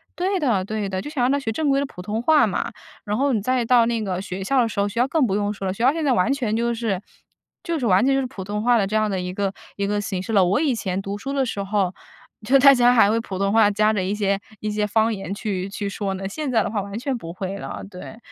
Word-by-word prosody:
对 380 Hz, +2 st, 0 dB
的， 235 Hz, -, +1 dB
对 210 Hz, -1 st, -3 dB
的， 190 Hz, -1 st, -3 dB
就 295 Hz, -, -7 dB
是 -, -, -11 dB
想 260 Hz, -, 0 dB
让 255 Hz, -, +3 dB
他 285 Hz, -, +2 dB
学 245 Hz, -5 st, -4 dB
正 295 Hz, +6 st, 0 dB
规 275 Hz, 0 st, +3 dB
的 280 Hz, -, 0 dB
普 180 Hz, -, -10 dB
通 210 Hz, +4 st, -3 dB
话 310 Hz, +4 st, +5 dB
嘛。 -, -, -2 dB, 0.3 s
然 210 Hz, +1 st, -1 dB
后 275 Hz, +2 st, +2 dB
你 220 Hz, -, 0 dB
再 255 Hz, +3 st, +1 dB
到 235 Hz, 0 st, +4 dB
那 230 Hz, -1 st, -1 dB
个 185 Hz, -2 st, -2 dB
学 190 Hz, 0 st, -5 dB
校 265 Hz, +5 st, +2 dB
的 235 Hz, -, +2 dB
时 225 Hz, -, -8 dB
候， -, -, +2 dB
学 230 Hz, -, -4 dB
校 250 Hz, -, +3 dB
更 295 Hz, 0 st, +2 dB
不 200 Hz, -, -1 dB
用 205 Hz, 0 st, 0 dB
说 200 Hz, -1 st, -6 dB
了， 185 Hz, -, -1 dB
学 215 Hz, -, -8 dB
校 270 Hz, -, +5 dB
现 325 Hz, -, -2 dB
在 285 Hz, -, +2 dB
完 245 Hz, +2 st, +2 dB
全 235 Hz, -6 st, -1 dB
就 235 Hz, +1 st, 0 dB
是 220 Hz, -5 st, -2 dB, 0.6 s
就 335 Hz, -2 st, -2 dB
是 250 Hz, -, -2 dB
完 195 Hz, +2 st, +4 dB
全 275 Hz, -, +3 dB
就 -, -, +2 dB
是 265 Hz, -, -2 dB
普 210 Hz, -7 st, -8 dB
通 210 Hz, +2 st, -3 dB
话 240 Hz, +1 st, +4 dB
的 205 Hz, -, +2 dB
这 215 Hz, +3 st, 0 dB
样 215 Hz, 0 st, +1 dB
的 190 Hz, -2 st, -2 dB
一 180 Hz, 0 st, -4 dB
个 195 Hz, 0 st, -1 dB, 0.2 s
一 200 Hz, 0 st, -1 dB
个 205 Hz, 0 st, 0 dB
形 195 Hz, -2 st, -3 dB
式 205 Hz, +4 st, -5 dB
了。 195 Hz, -3 st, +5 dB
我 185 Hz, +3 st, +2 dB
以 290 Hz, -5 st, +1 dB
前 190 Hz, -4 st, -2 dB
读 195 Hz, +1 st, -5 dB
书 270 Hz, +6 st, -5 dB
的 275 Hz, -1 st, +1 dB
时 205 Hz, -4 st, -3 dB
候， 195 Hz, -2 st, 0 dB, 0.5 s
就 270 Hz, +4 st, +5 dB
大 275 Hz, +1 st, +8 dB
家 245 Hz, -1 st, +5 dB
还 225 Hz, -4 st, +5 dB
会 220 Hz, -, +2 dB
普 190 Hz, -4 st, -6 dB
通 195 Hz, +1 st, +1 dB
话 220 Hz, -2 st, +5 dB
夹 215 Hz, +1 st, +2 dB
着 190 Hz, -, 0 dB
一 190 Hz, +2 st, -1 dB
些 200 Hz, -2 st, 0 dB, 0.2 s
一 215 Hz, -, -3 dB
些 210 Hz, 0 st, 0 dB
方 220 Hz, +2 st, +2 dB
言 195 Hz, 0 st, -5 dB
去 200 Hz, -2 st, -3 dB
去 200 Hz, 0 st, -4 dB
说 200 Hz, 0 st, -3 dB
呢， 195 Hz, 0 st, -4 dB
现 290 Hz, +7 st, -4 dB
在 225 Hz, -3 st, +3 dB
的 -, -, -3 dB
话 205 Hz, -1 st, -1 dB
完 200 Hz, +3 st, -6 dB
全 265 Hz, 0 st, -2 dB
不 165 Hz, -7 st, -8 dB
会 190 Hz, +2 st, -5 dB
了。 -, -, -6 dB
对， 185 Hz, +3 st, -10 dB
215 Hz, 335 characters per minute, -22 LUFS, 195-250 Hz, 0.6 s, 大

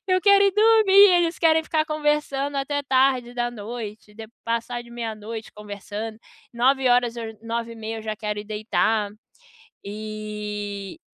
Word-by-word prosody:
Eu 370 Hz, 0 st, +3 dB
quero 400 Hz, 0 st, +6 dB
ir 395 Hz, -, +3 dB
dormir, 430 Hz, -1 st, +4 dB
e 400 Hz, -1 st, +9 dB
eles 340 Hz, -1 st, +1 dB
querem 320 Hz, -1 st, +4 dB
ficar 310 Hz, -1 st, +1 dB
conversando 295 Hz, -2 st, -1 dB
até 285 Hz, +1 st, -1 dB
tarde 260 Hz, -2 st, +2 dB
da 240 Hz, 0 st, -1 dB
noite, 215 Hz, -2 st, -8 dB
depo 220 Hz, 0 st, -10 dB
passar 235 Hz, +1 st, -2 dB
de 235 Hz, -, -16 dB
meia 230 Hz, -2 st, -4 dB
noite 220 Hz, +1 st, -8 dB
conversando. 210 Hz, +1 st, -7 dB, 0.4 s
21h 245 Hz, -1 st, +3 dB
eu 230 Hz, -, -4 dB
j -, -, -26 dB
21h30 225 Hz, -1 st, -5 dB
eu -, -, 0 dB
já -, -, -7 dB
quero 210 Hz, -1 st, -3 dB
ir -, -, -9 dB
deitar. 215 Hz, 0 st, 0 dB, 0.7 s
E 210 Hz, -, -6 dB
235 Hz, 155 wpm, -24 LUFS, 215-285 Hz, 0.7 s, e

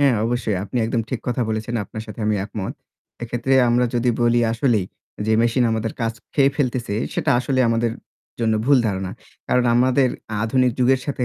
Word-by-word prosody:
হ্যাঁ, 140 Hz, -3 st, +4 dB
অবশ্যই 115 Hz, -3 st, -1 dB
আপনি 105 Hz, +5 st, -6 dB
একদম 115 Hz, +1 st, 0 dB
ঠিক 130 Hz, -, -2 dB
কথা 125 Hz, 0 st, 0 dB
বলেছেন। 110 Hz, +2 st, -3 dB
আপনার 110 Hz, +3 st, -7 dB
সাথে 105 Hz, +2 st, -9 dB
আমি 105 Hz, -, +2 dB
একমত। 105 Hz, -2 st, -5 dB, 0.5 s
এক্ষেত্রে 120 Hz, +3 st, 0 dB
আমরা 120 Hz, +1 st, +3 dB
যদি 120 Hz, 0 st, +2 dB
বলি 120 Hz, 0 st, +3 dB
আসলেই, 115 Hz, -5 st, +1 dB, 0.4 s
যে 110 Hz, -, +2 dB
মেশিন 120 Hz, +2 st, +2 dB
আমাদের 110 Hz, 0 st, -1 dB
কাজ 115 Hz, 0 st, 0 dB, 0.2 s
খেয়ে 140 Hz, -1 st, +4 dB
ফেলতেছে, 125 Hz, -6 st, -1 dB, 0.2 s
সেটা -, -, 0 dB
আসলেই 130 Hz, +1 st, +1 dB
আমাদের 115 Hz, 0 st, +1 dB, 0.5 s
জন্য 110 Hz, -1 st, +2 dB
ভুল 140 Hz, -1 st, +6 dB
ধারণা। 95 Hz, -2 st, -2 dB, 0.4 s
কারণ 125 Hz, 0 st, +3 dB
আমাদের 130 Hz, +2 st, +3 dB, 0.4 s
আধুনিক 125 Hz, +2 st, +2 dB
যুগের 130 Hz, +1 st, +3 dB
সাথে 135 Hz, -3 st, -1 dB
120 Hz, 175 wpm, -21 LUFS, 110-125 Hz, 0.5 s, ভুল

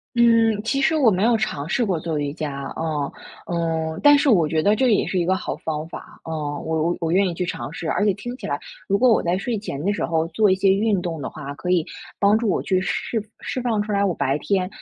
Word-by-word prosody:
嗯， 230 Hz, -2 st, +4 dB
其 275 Hz, +5 st, 0 dB
实 320 Hz, +4 st, +3 dB
我 265 Hz, -8 st, +5 dB
没 185 Hz, -1 st, 0 dB
有 230 Hz, +1 st, +4 dB
尝 155 Hz, -8 st, -3 dB
试 240 Hz, -, +1 dB
过 185 Hz, -6 st, 0 dB
做 160 Hz, -1 st, -3 dB
瑜 145 Hz, -1 st, -2 dB
伽， 145 Hz, -3 st, -5 dB
啊， 150 Hz, -3 st, -2 dB, 0.3 s
嗯， 165 Hz, -2 st, -2 dB
但 290 Hz, 0 st, +7 dB
是 285 Hz, -, +1 dB
我 175 Hz, -10 st, +4 dB
觉 160 Hz, +1 st, 0 dB
得 205 Hz, +5 st, +3 dB
这 255 Hz, +4 st, +2 dB
个 -, -, +4 dB
也 210 Hz, -, +3 dB
是 185 Hz, -, -1 dB
一 170 Hz, -, +1 dB
个 185 Hz, +2 st, +2 dB
好 195 Hz, -, -4 dB
方 155 Hz, 0 st, -4 dB
法， -, -, -11 dB
啊， 160 Hz, -, -7 dB
我 155 Hz, +1 st, -2 dB
我 170 Hz, +2 st, 0 dB
我 165 Hz, -2 st, -1 dB
愿 190 Hz, +2 st, +3 dB
意 -, -, -4 dB
去 180 Hz, +2 st, -2 dB
尝 160 Hz, -, -5 dB
试。 165 Hz, 0 st, -6 dB
而 -, -, +1 dB
且 210 Hz, -, +4 dB
听 240 Hz, +4 st, -6 dB
起 -, -, -7 dB
来 145 Hz, -, -2 dB, 0.3 s
如 200 Hz, -, +2 dB
果 255 Hz, -, +4 dB
我 -, -, +4 dB
在 175 Hz, +2 st, 0 dB
睡 235 Hz, +4 st, -2 dB
前 170 Hz, -9 st, -5 dB
的 205 Hz, -, +2 dB
时 -, -, -3 dB
候 165 Hz, -1 st, 0 dB
做 205 Hz, +5 st, +3 dB
一 185 Hz, -, +4 dB
些 190 Hz, +1 st, +2 dB
运 205 Hz, 0 st, +1 dB
动 170 Hz, -4 st, -4 dB
的 130 Hz, -, -4 dB
话， 145 Hz, -2 st, -7 dB
可 180 Hz, +5 st, -6 dB
以 175 Hz, -3 st, +2 dB, 0.3 s
帮 200 Hz, +1 st, +4 dB
助 225 Hz, -1 st, +1 dB
我 185 Hz, -, +1 dB
去 185 Hz, -1 st, +1 dB
释 220 Hz, +3 st, -2 dB, 0.2 s
释 255 Hz, -, -4 dB
放 235 Hz, -3 st, 0 dB
出 210 Hz, -, -5 dB
来 200 Hz, 0 st, +2 dB
我 195 Hz, -, +2 dB
白 135 Hz, -, 0 dB
天， 190 Hz, 0 st, 0 dB
185 Hz, 290 characters per minute, -22 LUFS, 160-215 Hz, 0.3 s, 但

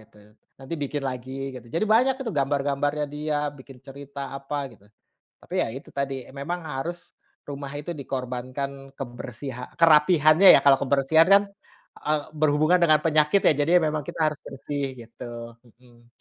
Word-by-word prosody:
gitu, 110 Hz, 0 st, -22 dB, 0.4 s
nanti 135 Hz, +5 st, -6 dB
bikin 145 Hz, +1 st, -3 dB
lagi 130 Hz, 0 st, -6 dB, 0.2 s
gitu 125 Hz, -2 st, -10 dB
jadi 165 Hz, -, +1 dB
banyak 255 Hz, +3 st, +4 dB
tuh 230 Hz, -8 st, -4 dB
gambar-gambarnya 145 Hz, +1 st, 0 dB
dia 150 Hz, 0 st, -2 dB, 0.2 s
bikin 130 Hz, -1 st, -13 dB
cerita 140 Hz, +1 st, -9 dB, 0.2 s
apa 140 Hz, +2 st, -5 dB, 0.2 s
gitu, 100 Hz, -, -24 dB, 0.6 s
tapi -, -, -9 dB
ya -, -, +1 dB
itu 135 Hz, -, -10 dB
tadi 140 Hz, 0 st, -1 dB
e -, -, -13 dB
memang 175 Hz, +5 st, -3 dB
harus, 135 Hz, +6 st, -3 dB, 0.5 s
rumah 140 Hz, -1 st, -6 dB
itu 150 Hz, +4 st, -6 dB
dikorbankan 130 Hz, +1 st, -4 dB, 0.3 s
kebersiha 125 Hz, 0 st, -7 dB, 0.2 s
kerapihannya 155 Hz, +2 st, +6 dB
ya, -, -, +3 dB
kalau 135 Hz, -1 st, +6 dB
kebersihan 140 Hz, +4 st, +4 dB
kan, 200 Hz, -, +6 dB, 0.6 s
eee, 150 Hz, 0 st, +2 dB, 0.2 s
berhubungan 155 Hz, +3 st, +3 dB
dengan 155 Hz, -3 st, +5 dB
penyakit 155 Hz, +3 st, +3 dB
ya -, -, +7 dB
jadi -, -, 0 dB, 0.2 s
memang 155 Hz, 0 st, -1 dB
kita -, -, -6 dB
harus 150 Hz, -, -11 dB
bersih 140 Hz, +1 st, -4 dB, 0.2 s
gitu, 115 Hz, +1 st, -11 dB, 0.4 s
mhm. 120 Hz, 0 st, -23 dB
140 Hz, 155 wpm, -25 LUFS, 130-155 Hz, 0.6 s, ya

